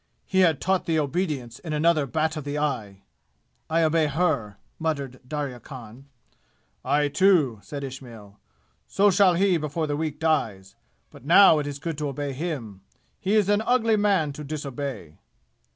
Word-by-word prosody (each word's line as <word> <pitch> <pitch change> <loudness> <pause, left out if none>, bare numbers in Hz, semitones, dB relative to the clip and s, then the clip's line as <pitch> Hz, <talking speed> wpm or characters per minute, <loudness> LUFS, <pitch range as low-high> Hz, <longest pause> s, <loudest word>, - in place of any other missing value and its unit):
He 190 - 0
had 165 -6 +4
taught 190 0 0
thee 165 -1 +1
obedience 145 -6 -2
in 160 -3 -6
another 155 -1 +2
bat 160 +3 -1
of 155 - -5
the 145 +1 -4
eye!" 110 -10 -3 0.7
"I 165 +1 +2
obey 160 0 +2
her!" 140 - -1 0.2
muttered 140 -5 -3
Darya 140 -3 -4
Khan. 125 0 -12 0.8
"I, 145 +2 +2
too," 150 - +3
said 140 +4 -7
Ishmail. 120 -6 -10 0.5
"So 200 +1 +3
shall 185 -1 +4
he 190 0 +3
before 155 +1 -2
the 145 -1 -2
week 155 -1 -3
dies! 110 - -1 0.4
But - - -15
now 165 +1 +7
it 145 - -3
is 145 -1 -5
good 160 +1 -5
to 150 - -2
obey 140 0 -4
him. 130 - -5 0.4
He 195 +3 0
is 210 -3 +3
an 205 +1 +2
ugly 230 -1 +2
man 195 -8 +1
to 150 - -8
disobey!" 140 - -6
150 Hz, 165 wpm, -25 LUFS, 135-170 Hz, 0.8 s, now